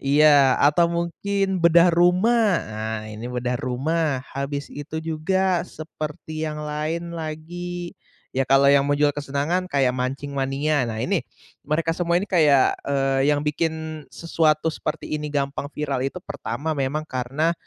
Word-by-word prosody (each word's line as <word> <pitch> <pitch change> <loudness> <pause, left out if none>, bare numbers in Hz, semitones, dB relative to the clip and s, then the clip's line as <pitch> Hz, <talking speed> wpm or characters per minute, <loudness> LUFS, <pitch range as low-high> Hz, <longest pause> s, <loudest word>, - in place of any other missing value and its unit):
iya, 140 -1 +5
atau 150 +4 +5
mungkin 190 +3 -1
Bedah 170 +1 +6
Rumah. 180 +8 +4 0.3
Ah, 110 0 -3
ini 110 +3 -7
Bedah 125 0 -2
Rumah, 135 +2 -1
habis 140 +1 -3
itu 150 +2 -6
juga 180 +3 +1
seperti 155 0 -6
yang 150 0 -5
lain 155 +3 -3
lagi, 170 +2 -6 0.4
ya, 135 - +2
kalau 135 0 +5
yang 140 -1 +5
menjual 145 0 +3
kesenangan 145 +6 -1
kayak 135 -3 +2
Mancing 135 +3 -3
Mania, 135 +1 0
nah, 110 - -4
ini - - +1 0.5
mereka 155 +2 0
semua 170 -1 +1
ini 200 - -4
kayak, 150 -7 +4
eee, 135 0 +2
yang 145 - +1
bikin 160 0 -2
sesuatu 160 -2 +1
seperti 155 - -5
ini 150 0 -4
gampang 140 0 -2
viral 140 -3 -2
itu 135 +7 -3
pertama, 145 +1 -4
memang 140 +3 -1
karena 135 +6 0
150 Hz, 145 wpm, -23 LUFS, 140-165 Hz, 0.5 s, Bedah